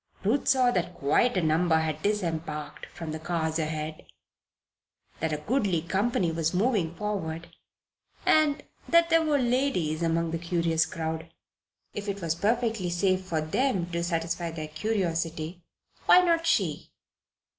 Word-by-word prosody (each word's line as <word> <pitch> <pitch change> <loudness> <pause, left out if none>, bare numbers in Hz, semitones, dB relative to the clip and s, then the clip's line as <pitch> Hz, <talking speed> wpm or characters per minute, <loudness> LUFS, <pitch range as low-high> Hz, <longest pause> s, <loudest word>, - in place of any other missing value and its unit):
Ruth 230 +8 +1
saw 255 -2 +4
that 180 -3 -1
quite 195 - +2
a 180 - +1
number 160 +2 +3
had 155 -1 -1
disembarked 160 -7 -3
from 165 -2 -7
the 155 - -4
cars 160 0 -1
ahead, 155 0 -4 1.1
that 160 0 -1
a 150 - 0
goodly 190 - 0
company 190 -1 0
was 165 +1 -1
moving 190 -5 +1
forward, 170 -6 -4 0.7
and 300 -2 +3 0.3
that 335 0 +4
there 330 0 +6
were 305 -2 +2
ladies 240 - 0
among 165 0 +1
the 165 - -2
curious 165 -1 +1
crowd. 160 -1 -4 0.6
If 205 0 -5
it 200 0 -3
was 165 -4 -1
perfectly 220 +1 0
safe 185 +2 +1
for 165 -4 -1
them 185 - 0
to 170 0 -1
satisfy 170 0 -2
their 155 -2 -6
curiosity, 165 -2 -2 0.5
why 365 - +8
not 335 -2 +2
she? 335 - +1
170 Hz, 145 wpm, -27 LUFS, 160-215 Hz, 1.1 s, why